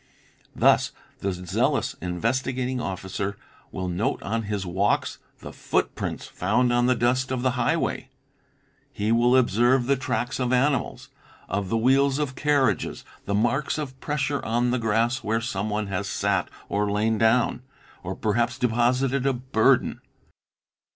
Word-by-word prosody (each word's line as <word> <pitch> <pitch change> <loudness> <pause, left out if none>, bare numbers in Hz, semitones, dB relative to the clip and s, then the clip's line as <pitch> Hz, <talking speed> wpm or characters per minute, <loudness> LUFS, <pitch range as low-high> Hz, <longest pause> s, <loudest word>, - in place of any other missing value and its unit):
Thus - - +3 0.3
the 100 - -1
zealous 90 -1 -1
Investigating 125 +7 -1
Officer 95 +1 -4 0.3
will 95 0 -4
note 90 +4 -1
on 115 +2 -1
his 100 -2 -2
walks 95 +3 0 0.2
the - - -9
footprints - - -2
found 120 +6 +1
on 120 0 +3
the 125 - +3
dust 125 +2 +1
of 125 -1 -2
the 130 - +2
highway; 130 0 -1 0.8
he 105 -4 -1
will 120 +2 +4
observe 120 +1 +3
the 140 +2 +3
tracks 130 -1 -2
of 125 -1 0
animals, 130 +2 0 0.4
of 100 -1 -2
the 115 - +1
wheels 135 +4 +3
of 145 -3 -2
carriages, 145 -1 0 0.2
the 100 - -1
marks 125 +9 +1
of 130 -4 -5
pressure 145 -1 -2
on 120 +2 +1
the 125 - 0
grass 115 +3 +1
where 110 +2 0
someone 105 -2 -2
has 100 -2 -3
sat - - 0 0.2
or 105 0 0
lain 105 +2 +1
down, 115 +2 +2 0.4
or 95 +1 -5
perhaps 120 +4 0
deposited 125 +2 +1
a 135 - +3
burden. 125 +1 +2
120 Hz, 145 wpm, -25 LUFS, 105-130 Hz, 0.8 s, will